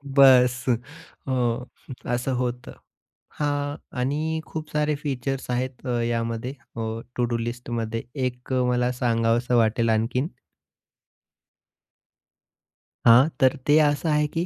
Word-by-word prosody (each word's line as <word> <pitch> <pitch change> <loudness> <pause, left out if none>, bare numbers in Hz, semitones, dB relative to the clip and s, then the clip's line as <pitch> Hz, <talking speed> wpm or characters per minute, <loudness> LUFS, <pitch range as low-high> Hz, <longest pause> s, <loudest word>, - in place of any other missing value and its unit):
बस 130 -2 +6 0.6
अ, 130 - 0 0.8
असं 125 +2 -1
होतं. 125 -1 -3 0.7
हां 145 -1 -1 0.2
आणि 155 +5 -1
खूप 155 -1 -6
सारे 150 0 +1
फीचर्स 135 -2 -3
आहेत 125 +1 -3
अ, 120 -1 0
यामध्ये 115 +1 -2 0.2
अ, - - -2 0.3
टू-डू 120 -1 0
लिस्टमध्ये. 115 -1 -3
एक 125 -1 -3
मला 125 0 +1
सांगावसं 120 0 +1
वाटेल 115 0 +2
आणखीन. 115 +5 +1 2.8
हां. 125 +6 +7
तर 130 0 +5
ते 145 +1 +6
असं 145 +1 +2
आहे 150 0 +3
की 165 +3 -2
125 Hz, 110 wpm, -24 LUFS, 120-145 Hz, 2.8 s, हां